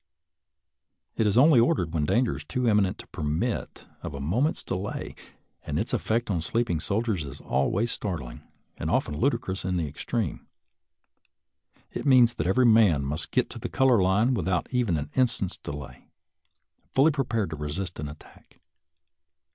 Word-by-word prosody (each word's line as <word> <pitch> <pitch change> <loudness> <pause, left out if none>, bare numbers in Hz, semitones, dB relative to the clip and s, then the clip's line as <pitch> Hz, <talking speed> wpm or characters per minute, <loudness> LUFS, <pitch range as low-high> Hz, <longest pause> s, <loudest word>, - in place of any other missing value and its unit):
It 110 - +2
is 105 - +1
only 140 0 +7
ordered 90 -8 +2
when 75 -3 +1
danger 120 - +2
is - - -7
too 125 -2 -2
imminent 105 -4 +2
to - - -11
permit 80 +11 -3 0.2
of 75 - -6
a - - -6
moment's 110 - 0
delay, 95 +2 -4 0.5
and - - -3
its - - -2
effect 115 0 0
on 85 -4 0
sleeping 105 -1 0
soldiers 100 0 -1
is 70 -2 -8
always 100 - 0
startling, 80 - -5 0.4
and - - -3
often 75 - 0
ludicrous 115 - -1
in 90 0 -1
the 80 -3 -1
extreme. 70 - -3 1.4
It - - -4
means 125 -3 +6
that 85 -8 -2
every 125 +7 +3
man 105 - +5
must 75 +4 -3
get - - +1
to - - -8
the - - -5
color 130 -6 +4
line 100 +7 +3
without 95 -5 0
even 120 -10 +1
an 75 0 -5
instant's 120 -7 0
de - - -7
lay, 70 -2 -9 0.8
fully 140 +4 +4
prepared 120 - -1
to - - -3
resist 80 +5 -5
an 75 - -3
attack. 75 - -16
100 Hz, 165 wpm, -26 LUFS, 80-120 Hz, 1.4 s, only